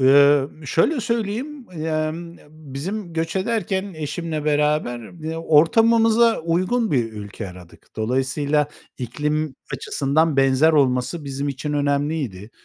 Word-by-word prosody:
Emm, 140 +2 +4
şöyle 260 - +2
söyleyeyim, 235 +5 -3
emm, 160 +1 -3
bizim 155 +6 -6
göç 165 +2 -2
ederken 195 -2 -1
eşimle 155 0 -4
beraber 150 -1 0
b 160 +1 -3
ortamımıza 225 +9 +4
uygun 185 +8 0
bir 120 -5 0
ülke 105 -2 -7
aradık. 90 -1 -14
Dolayısıyla 135 +6 0 0.3
iklim 150 +4 -2 0.2
açısından 140 +3 0
benzer 135 +4 +4
olması 140 +2 +1
bizim 140 +1 -3
için 140 +2 -3
önemliydi. 140 - -1
150 Hz, 110 wpm, -22 LUFS, 135-170 Hz, 0.3 s, Emm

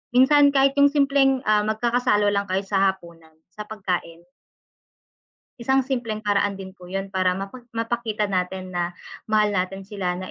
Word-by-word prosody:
minsan 285 +3 +6
kahit 275 -1 +3
'yung 285 0 +7
simpleng, 275 -2 +2
ah, 210 0 +3
mag-kakasalo 215 -2 +1
lang 200 0 -1
kayo 190 +1 0
sa 195 -1 +2
hapunan 170 -4 -10 0.2
sa 210 0 -8
pagkain. 180 -5 -4 1.4
Isang 265 +2 +2
simpleng 230 -5 -3
paraan 205 -1 +1
din 190 -1 -9
po 180 -2 -14
'yun 195 +1 -4
para 185 -1 +1
mapa 195 +6 -7 0.2
mapakita 230 -2 -2
natin 185 0 -3
na 175 0 -3 0.3
mahal 210 -1 +2
natin 195 +1 -2
sila, 190 -3 -3
na 185 +1 -7
205 Hz, 155 wpm, -23 LUFS, 185-240 Hz, 1.4 s, yung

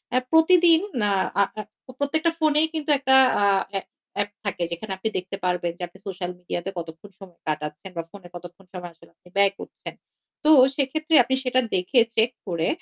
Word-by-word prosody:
আ - - +5
প্রতিদিন 330 0 +6 0.2
না 205 -1 +2 0.3
আ - - +7 0.2
আ - - -1 0.4
প্রত্যেকটা 315 +4 +1
ফোনেই 310 0 +3
কিন্তু 310 -2 -4
একটা 265 -1 +3 0.3
আ - - +3 0.3
অ্যা 195 -1 -2 0.3
অ্যাপ 205 0 -1 0.2
থাকে 195 -3 -2
যেখানে 180 +5 -6
আপনি 220 +4 -2
দেখতে 185 +1 -5
পারবেন 180 -1 0
যে 180 - -7
আপনি 175 - -19
সোশ্যাল 180 -2 -4
মিডিয়াতে 175 +1 -4
কতক্ষণ 165 +3 -8
সময় 185 -4 -14
কাটাচ্ছেন 150 +4 -4
বা 165 - -2
ফোনে 195 -3 -12
কতক্ষণ 175 +2 -11
সময় 180 -1 -7
আসলে 170 0 -21
আপনি 180 - -21
ব্যয় 200 0 +4
করছেন। - - -9 0.5
তো 305 - +5 0.2
সেক্ষেত্রে 310 +4 0
আপনি 260 +2 0
সেটা 255 0 +2 0.2
দেখে, 185 +8 +2 0.2
চেক 225 +2 +3 0.2
করে 170 -3 -1
195 Hz, 185 wpm, -24 LUFS, 175-280 Hz, 0.5 s, আ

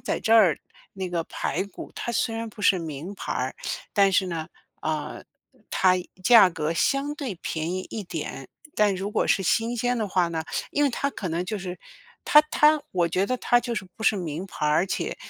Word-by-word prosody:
在 - - -2
这 225 - 0
儿 190 -9 +5 0.4
那 190 -1 -4
个 170 -1 -1
排 - - -2
骨 200 - -10
它 240 - -4
虽 225 -1 0
然 230 0 -4
不 210 - -13
是 195 - +5
名 165 +3 -6
牌 - - -7
儿， - - -2 0.4
但 200 -2 +4
是 190 0 +3
呢， 165 -3 -4 0.3
呃， 155 -1 -3 0.5
它 185 -1 +4 0.3
价 225 -5 +8
格 160 -1 -2
相 275 - 0
对 270 -9 -4
便 160 0 -3
宜 185 0 -4
一 220 - -4
点。 160 -7 -6 0.3
但 210 -2 +3
如 195 +2 -3
果 - - +1
是 - - +3
新 230 +6 +1
鲜 245 +1 0
的 215 -2 -1
话 180 -2 +2
呢， 160 -1 -3 0.3
因 290 - +1
为 280 - +3
它 280 +3 -1
可 195 - -5
能 170 +2 -2
就 215 +3 -3
是 180 -1 -6 0.5
它 300 - +8
它， 300 0 +5
我 175 -2 +1
觉 185 +3 +1
得 255 - 0
它 240 0 +3
就 240 -1 -3
是 210 - -3
不 - - -9
是 220 - +3
名 170 0 -4
牌 150 - -3
儿， 150 - +3
而 170 - +3
且 - - -3
190 Hz, 230 characters per minute, -25 LUFS, 170-225 Hz, 0.5 s, 价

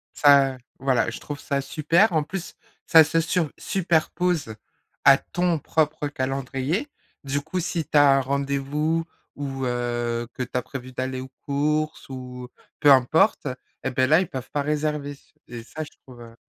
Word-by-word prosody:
Ça 140 -2 +5 0.2
voilà, 130 -4 +1
je 115 - -7
trouve 145 -1 -7
ça 140 -1 -1
super. 165 +8 +2
En 155 -2 +2
plus, 180 +3 -6 0.3
ça 160 -1 +8
se 160 +2 +1
sur 160 -1 0
superpose 175 - 0 0.5
à - - +9
ton 175 -2 -1
propre 150 0 0
calendrier. 135 - -2 0.4
Du 140 +1 -1
coup, 160 +5 -4
si 170 -2 -2
tu - - +1
as 140 -1 +6
un - - +2
rendez-vous 140 +4 -1 0.3
ou, 135 -2 -4
heu, 120 -1 -2
que 130 - -3
tu 125 - -8
as 125 - +1
prévu 130 -1 -8
d'aller 130 0 -3
aux 130 0 -10
courses 150 +2 -1
ou 125 -1 -8 0.3
peu 145 - +6
importe 140 - +4 0.4
et 130 - -1
beh, 130 0 +2
là, 155 +4 +6
ils 185 - -2
peuvent 130 -1 -7
pas 145 - 0
réserver 150 -1 -1
s 140 - -15
et 120 -2 -8
ça, 155 +7 -6
je 150 - -10
trouve, 125 -2 -14
heu 115 -1 -12
140 Hz, 175 wpm, -24 LUFS, 130-155 Hz, 0.5 s, à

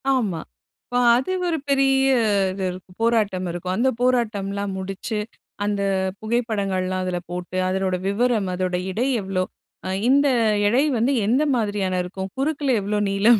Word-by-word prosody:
ஆமா. 205 -10 -1 0.4
இப்ப 245 - -1 0.2
அது 260 +9 0 0.2
ஒரு 335 -2 0
பெரிய 270 -1 +3 0.5
இது 190 +1 -5
இருக்கு 180 +1 -11
போராட்டம் 210 -5 +1
இருக்கும். 175 +1 -3
அந்த 260 +3 +3
போராட்டம்லாம் 205 -5 0
முடிச்சு, 195 +3 -4 0.5
அந்த 205 -1 0 0.4
புகைப்படங்கள்லாம் 200 -5 -1
அதில 180 -1 -2
போட்டு 180 +1 -5
அதனோட 190 0 0
விவரம் 215 0 +1
அதோட 180 0 -1 0.2
எடை 235 +7 0
எவ்வளோ, 190 -1 -1 0.7
இந்த 280 +2 +5 0.4
எடை 245 +7 +3
வந்து 235 +5 +2
எந்த 250 +8 +3
மாதிரியான 205 -5 0
இருக்கும். 190 +1 -5
குறுக்கில 280 -1 0
எவ்ளோ 205 +2 -1
நீளம், 210 +4 +5
205 Hz, 135 wpm, -23 LUFS, 185-245 Hz, 0.7 s, இந்த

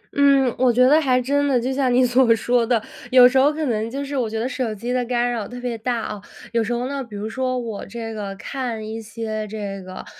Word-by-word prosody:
嗯， 275 -3 +4
我 255 -1 +4
觉 250 +2 +4
得 305 +3 +5
还 255 -4 +2
真 285 +3 +1
的， 265 -3 +3
就 255 +3 -2
像 260 -2 +1
你 250 +1 +4
所 245 -1 +4
说 240 +2 +1
的， 240 -1 +3 0.3
有 250 -1 +8
时 265 +1 +3
候 280 +3 +5
可 310 0 -3
能 225 -3 -1
就 275 +3 -4
是 280 +1 -5
我 245 -5 0
觉 220 0 -3
得 235 - -1
手 250 -3 -2
机 240 +4 -4
的 250 - +1
干 245 0 0
扰 225 -4 -3
特 245 - -8
别 245 -1 -3
大， 235 +1 -2
啊。 210 -2 -5 0.3
有 230 -1 +1
时 220 - -3
候 240 +1 -1
呢， 275 0 -3
比 225 -4 -11
如 205 +1 -4
说 255 +2 -2
我 230 -4 -5
这 225 +1 -6
个， 200 -2 -5
看 230 0 -5
一 225 +1 -5
些 215 -1 -5
这 200 -2 -5
个， 185 0 -9
245 Hz, 275 characters per minute, -22 LUFS, 220-260 Hz, 0.3 s, 有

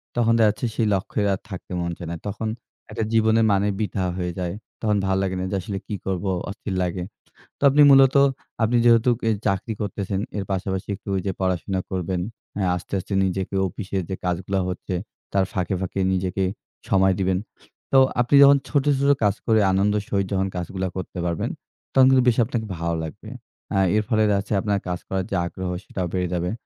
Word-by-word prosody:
তখন 115 -1 +3
দেখাচ্ছে 110 +2 +3
সেই 110 - +1
লক্ষ্যের 100 +2 -1
আর 95 - -3
থাকতে 95 -1 -8
মন 85 0 -2
চায়না। 85 0 -5
তখন 105 +2 -3 0.4
একটা - - -2
জীবনের 110 0 +4
মানে 100 +1 +2
বৃথা 105 -2 -2
হয়ে 90 -1 -2
যায়। 90 -1 -2 0.3
তখন 105 -2 +2
ভালো 95 0 +1
লাগে 95 -1 -1
না, 90 - -2
যে - - 0
আসলে 100 +2 -4
কি 105 - -3
করব, 95 -1 -2 0.3
অস্থির 100 -1 -5
লাগে। 90 0 -2 0.5
তো - - -58
আপনি 145 +2 +4
মূলত, 135 0 +6 0.5
আপনি 120 +2 +3
যেহেতুক 120 0 +5
এই 110 - +2
চাকরি 95 +4 -1
করতেছেন, 100 -1 -2 0.2
এর 100 - -2
পাশাপাশি 95 0 -2
একটু - - -20
ওইযে 95 0 -1
পড়াশোনা 95 +1 0
করবেন, 90 -1 -2 0.4
অ্যা 95 -2 +1
আস্তে, 90 +2 -8
আস্তে 100 - -6
নিজেকে 95 +1 -2
অফিসে 95 +1 -5
যে 95 - -2
কাজগুলা 90 +2 -1
হচ্ছে 90 +1 -4 0.4
তার 100 -1 +3
ফাঁকে, 90 0 -1
ফাঁকে 95 +1 -3
নিজেকে 95 +1 -1 0.5
সময় 95 0 +4
দিবেন। 95 -1 +1 0.5
তো 135 - +5 0.2
আপনি 120 +4 +2
যখন 140 0 +8
ছোট, 145 -2 +1 0.2
ছোট 140 - +2
কাজ 100 -1 +3
করে 110 -2 +4
আনন্দের 100 +2 +2
সহিত 100 -1 +1
যখন 95 0 +1
কাজগুলা 95 +2 -3
করতে 95 0 -6
পারবেন, 85 -2 -1 0.4
তখন 130 -1 +7
কিন্তু 130 -1 +5
বেশ 120 -1 +4
আপনাকে 115 -1 -3
ভালো 85 0 -1
লাগবে। 100 +7 -8 0.5
আ - - +3 0.2
এর 110 - +2
ফলে 110 -1 +3
দেখাচ্ছে 100 +1 0
আপনার 100 -2 0
কাজ 90 -1 -2
করার 95 -1 -2
যে - - 0
আগ্রহ, 95 +1 -5 0.2
সেটাও 90 -2 -3
বেড়ে 90 -1 0
যাবে। 90 +1 -1
95 Hz, 190 wpm, -23 LUFS, 95-110 Hz, 0.5 s, যখন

